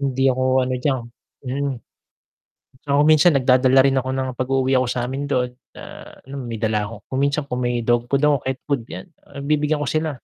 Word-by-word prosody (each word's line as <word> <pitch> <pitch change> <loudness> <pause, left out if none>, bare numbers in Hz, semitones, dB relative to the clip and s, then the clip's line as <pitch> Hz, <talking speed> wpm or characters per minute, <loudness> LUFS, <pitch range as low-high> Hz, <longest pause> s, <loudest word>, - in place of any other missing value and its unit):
hindi 135 -1 -1
ako 130 0 +1
ano 130 - -2
diyan, 130 -2 0 0.4
hmm. 140 +2 -2 1.1
Saka 140 - 0
kung 150 - +3
minsan 155 +1 +5
nagdadala 130 0 +4
rin 135 0 +2
ako 130 - -3
ng 130 0 -2
pag 130 - -1
uuwi 135 0 +1
ako 130 - +1
samin 130 +4 -3
dun, 125 -3 0 0.2
na - - -10 0.4
ano 135 +1 -11
may 115 - -5
dala 110 -2 0
ako 115 +2 -8
kung 130 - -2
minsan 140 +2 +1
kung 125 - -2
may 120 -1 -1
dog 120 +1 +1
food 140 +2 0
ako, 150 -1 +4
cat 130 0 -2
food, 140 -5 0
yan, - - -8 0.2
ah, 140 0 -9
bibigyan 150 +1 0
ko 140 - -2
sila. 155 0 0
130 Hz, 210 wpm, -21 LUFS, 125-140 Hz, 1.1 s, minsan